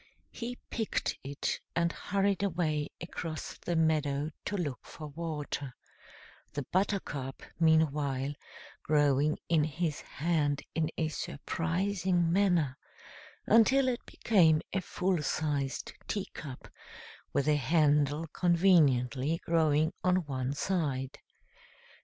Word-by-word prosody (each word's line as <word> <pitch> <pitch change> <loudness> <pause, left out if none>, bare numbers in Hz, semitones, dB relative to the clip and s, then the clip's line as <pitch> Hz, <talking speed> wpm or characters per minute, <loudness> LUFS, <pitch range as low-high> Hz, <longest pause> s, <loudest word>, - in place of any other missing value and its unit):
He 245 +1 -5
picked 225 -2 -1
it, 140 +1 -2 0.2
and 170 0 +2
hurried 200 0 0
away 160 -6 0
across 165 -2 -6
the 175 - -2
meadow 155 -2 +1
to 205 - -2
look 145 -8 -2
for 155 -1 -9
water, 145 -4 -4 0.8
the 145 0 -2
buttercup, 180 -9 -1 0.2
meanwhile, 145 -4 +2 0.5
growing 145 0 +3
in 165 -3 +3
his 155 0 -2
hand 150 -2 0
in 160 -1 0
a 160 -1 0
surprising 175 +3 -1
manner, 175 -8 +2 0.7
until 260 +4 +5
it 245 -1 -1
became 165 -8 +4
a 190 - +1
full 180 -1 0
sized 145 -2 -2
teacup, 155 -9 -5 0.6
with 140 - 0
a 150 -1 +4
handle 150 +1 +2
conveniently 160 -6 +3
growing 160 0 +3
on 185 -1 +2
one 130 -1 -2
side. 140 -5 -1
160 Hz, 105 wpm, -31 LUFS, 145-180 Hz, 0.8 s, until